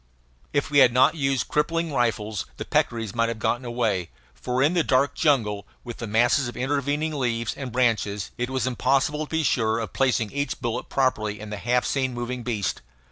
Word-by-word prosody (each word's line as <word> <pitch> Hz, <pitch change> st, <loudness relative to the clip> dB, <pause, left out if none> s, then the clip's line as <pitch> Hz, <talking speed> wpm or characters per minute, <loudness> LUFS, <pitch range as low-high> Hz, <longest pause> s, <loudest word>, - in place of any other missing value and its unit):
If 145 Hz, 0 st, -1 dB
we 145 Hz, -, +5 dB
had 125 Hz, -2 st, +7 dB
not 130 Hz, +5 st, +5 dB
used 135 Hz, -4 st, 0 dB
crippling 165 Hz, +1 st, 0 dB
rifles 110 Hz, -5 st, -1 dB
the -, -, -5 dB
peccaries 115 Hz, -4 st, 0 dB
might 115 Hz, 0 st, +1 dB
have 115 Hz, -, -3 dB
gotten 115 Hz, +3 st, -1 dB
away, 110 Hz, -8 st, -1 dB, 0.2 s
for 125 Hz, -, -1 dB
in 150 Hz, +5 st, +3 dB
the 175 Hz, -2 st, +2 dB
dark 135 Hz, +1 st, +2 dB
jungle, 105 Hz, -, +1 dB, 0.2 s
with 120 Hz, -1 st, -7 dB
the 115 Hz, -, -5 dB
masses 120 Hz, +5 st, +3 dB
of 120 Hz, -, -7 dB
intervening 145 Hz, +4 st, -1 dB
leaves 115 Hz, -5 st, -1 dB
and 130 Hz, -3 st, -6 dB
branches, 110 Hz, -5 st, 0 dB
it 125 Hz, 0 st, -2 dB
was 130 Hz, -2 st, -1 dB
impossible 135 Hz, +4 st, +1 dB
to -, -, -25 dB
be 160 Hz, 0 st, 0 dB
sure 110 Hz, -5 st, +1 dB
of 115 Hz, -2 st, -4 dB
placing 125 Hz, -5 st, +1 dB
each 145 Hz, +1 st, -2 dB
bullet 120 Hz, -1 st, -3 dB
properly 110 Hz, -6 st, 0 dB
in 105 Hz, 0 st, -8 dB
the 105 Hz, -, -4 dB
half 125 Hz, +3 st, +1 dB
seen 130 Hz, -3 st, -1 dB
moving 120 Hz, +1 st, -4 dB
beast. 110 Hz, -6 st, -2 dB
125 Hz, 195 wpm, -25 LUFS, 115-135 Hz, 0.2 s, had